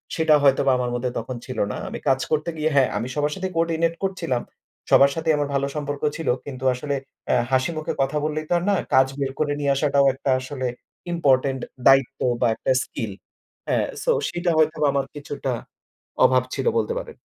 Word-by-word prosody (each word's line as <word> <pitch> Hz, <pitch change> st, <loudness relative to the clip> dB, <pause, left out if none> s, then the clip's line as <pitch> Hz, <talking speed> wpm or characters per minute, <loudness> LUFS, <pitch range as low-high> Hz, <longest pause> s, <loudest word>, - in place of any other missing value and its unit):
সেটা 160 Hz, -2 st, +4 dB
হয়তোবা 135 Hz, -1 st, +4 dB
আমার 125 Hz, -1 st, -1 dB
মধ্যে 125 Hz, +1 st, -2 dB
তখন 120 Hz, +3 st, -6 dB
ছিল 130 Hz, -, -5 dB
না। -, -, -4 dB
আমি -, -, -6 dB
কাজ 135 Hz, -1 st, +3 dB
করতে 155 Hz, +2 st, 0 dB
গিয়ে 155 Hz, +1 st, +1 dB
হ্যাঁ, 135 Hz, -2 st, +4 dB
আমি 115 Hz, +4 st, -3 dB
সবার 150 Hz, 0 st, 0 dB
সাথে 190 Hz, 0 st, -3 dB
কোঅর্ডিনেট 165 Hz, 0 st, +1 dB
করছিলাম। 170 Hz, -10 st, -1 dB, 0.5 s
সবার 140 Hz, 0 st, +7 dB
সাথেই 160 Hz, -1 st, +1 dB
আমার 145 Hz, -1 st, -1 dB
ভালো 140 Hz, 0 st, +1 dB
সম্পর্ক 145 Hz, -1 st, -4 dB, 0.2 s
ছিল। 165 Hz, -, -5 dB, 0.2 s
কিন্তু 130 Hz, -2 st, -7 dB
আসলে 140 Hz, +3 st, -3 dB, 0.3 s
অ্যা -, -, +3 dB
হাসিমুখে 155 Hz, +4 st, 0 dB
কথা 135 Hz, +3 st, 0 dB
বললেই 155 Hz, 0 st, -2 dB
তো -, -, +2 dB
আর 170 Hz, -, -2 dB
না 200 Hz, -, +3 dB, 0.2 s
কাজ 130 Hz, 0 st, +6 dB
বের 135 Hz, -1 st, -1 dB
করে 145 Hz, -1 st, +1 dB
নিয়ে 140 Hz, -1 st, +1 dB
আসাটাও 140 Hz, 0 st, +3 dB
একটা 135 Hz, +1 st, -4 dB
আসলে 130 Hz, 0 st, -4 dB, 0.5 s
ইম্পোর্টেন্ট 135 Hz, -5 st, +2 dB, 0.3 s
দায়িত্ব 135 Hz, -2 st, +4 dB, 0.2 s
বা -, -, +4 dB
একটা 130 Hz, -, -1 dB
স্কিল। 110 Hz, -3 st, -5 dB, 0.6 s
হ্যাঁ, -, -, +1 dB, 0.2 s
সো -, -, +2 dB, 0.2 s
সেটা 175 Hz, 0 st, -1 dB
হয়তো 155 Hz, 0 st, +3 dB
আমার 140 Hz, -1 st, 0 dB
কিছুটা 145 Hz, -2 st, -4 dB, 0.7 s
অভাব 130 Hz, 0 st, +4 dB
ছিল -, -, -3 dB
বলতে 470 Hz, -, 0 dB
পারেন। 475 Hz, -2 st, -9 dB
140 Hz, 185 wpm, -23 LUFS, 130-155 Hz, 0.7 s, সবার